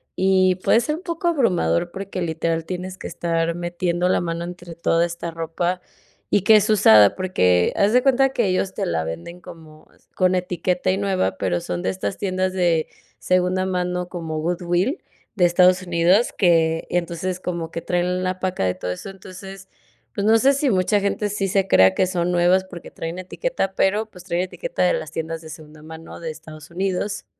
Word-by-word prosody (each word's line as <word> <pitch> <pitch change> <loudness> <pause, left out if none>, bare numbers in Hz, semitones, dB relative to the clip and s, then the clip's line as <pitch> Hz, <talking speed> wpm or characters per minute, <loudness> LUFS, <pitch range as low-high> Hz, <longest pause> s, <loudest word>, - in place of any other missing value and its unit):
y 185 -1 +3
puede 225 - +3
ser 300 +5 -2
un 340 - -9
poco 340 0 -3
abrumador 180 - +1
porque 195 -1 -6
literal 165 0 -2
tienes 185 +1 -6
que - - -7
estar 165 0 -1
metiendo 175 +1 -1
la - - +2
mano 170 0 -3
entre 175 -1 -9
toda 170 0 +1
esta 170 0 -5
ropa 165 +2 -2 0.5
y 205 - +3
que 215 +1 +7
es 210 +1 +1
usada, 110 - +6
porque 90 - +2
haz 205 +3 +3
de 250 +1 +4
cuenta 270 0 +4
que 235 -5 +1
ellos 190 +1 0
te - - -2
la 80 -1 -1
venden 85 - -7
como 155 -2 -14 0.3
con 185 0 +2
etiqueta 180 0 -1
y 190 - 0
nueva, 190 - -1
pero 90 -3 -1
son 90 0 -4
de 95 - 0
estas 100 +2 -4
tiendas 185 -1 -1
de 170 -4 +1 0.3
segunda 185 +1 +1
mano 180 -1 -2
como 160 -3 -5
Goodwilll 175 - -1 0.3
de 180 -3 +3
Estados 180 +1 +4
Unidos, 175 +5 +2
que 165 -3 +2
entonces, 175 +1 -2
como 170 -3 -4
que 170 - -5
traen 180 +1 -1
la 185 0 -2
paca 185 - -1
de 90 - 0
todo 90 - -4
eso. 90 - -7
Entonces, 195 0 -11 0.5
pues 200 - -1
no 225 +1 +6
sé 275 +3 +4
si 280 0 +1
mucha 200 +1 +2
gente 200 +1 -1
sí 195 -1 -2
se 195 0 +1
crea 95 - +5
que - - +2
son 180 -1 -1
nuevas 180 +2 +3
porque 175 -2 -11
traen 165 +2 -6
etiqueta, 195 - -3
pero 210 +3 +1
pues, 180 -2 -13
trae 175 0 -1
etiqueta - - -3
de - - +3
las - - -4
tiendas 165 0 -4
de 160 - -11
segunda 155 -1 -12
mano 160 +1 -10
de 165 -1 -5
Estados 155 0 -12
Unidos. 195 +2 -2
180 Hz, 195 wpm, -22 LUFS, 165-190 Hz, 0.5 s, que